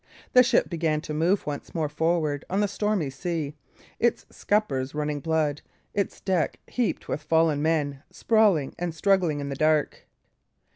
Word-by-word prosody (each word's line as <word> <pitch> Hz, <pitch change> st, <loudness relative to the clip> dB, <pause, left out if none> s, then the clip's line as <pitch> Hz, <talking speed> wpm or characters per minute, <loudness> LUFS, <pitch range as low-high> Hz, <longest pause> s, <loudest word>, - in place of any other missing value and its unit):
The 250 Hz, -, +9 dB
ship 245 Hz, -, +3 dB
began 160 Hz, -3 st, 0 dB
to 155 Hz, -, -6 dB
move 170 Hz, +6 st, +1 dB
once 145 Hz, +3 st, -6 dB
more 160 Hz, -2 st, 0 dB
forward 155 Hz, -1 st, 0 dB
on 190 Hz, -, 0 dB
the 205 Hz, -, +2 dB
stormy 205 Hz, -7 st, -1 dB
sea, 155 Hz, 0 st, -3 dB, 0.5 s
its 235 Hz, -, +1 dB
scuppers 140 Hz, -11 st, -1 dB
running 150 Hz, -1 st, -1 dB
blood, 155 Hz, -1 st, 0 dB, 0.3 s
its 200 Hz, -, -2 dB
deck 180 Hz, -6 st, 0 dB
heaped 245 Hz, -3 st, -2 dB
with 150 Hz, -, -3 dB
fallen 155 Hz, -1 st, +2 dB
men, 145 Hz, -3 st, 0 dB
sprawling 205 Hz, -11 st, +2 dB
and 170 Hz, -2 st, -3 dB
struggling 180 Hz, -4 st, +2 dB
in 140 Hz, 0 st, -4 dB
the 140 Hz, -, -3 dB
dark. 155 Hz, +1 st, +1 dB
160 Hz, 155 wpm, -26 LUFS, 150-190 Hz, 0.5 s, The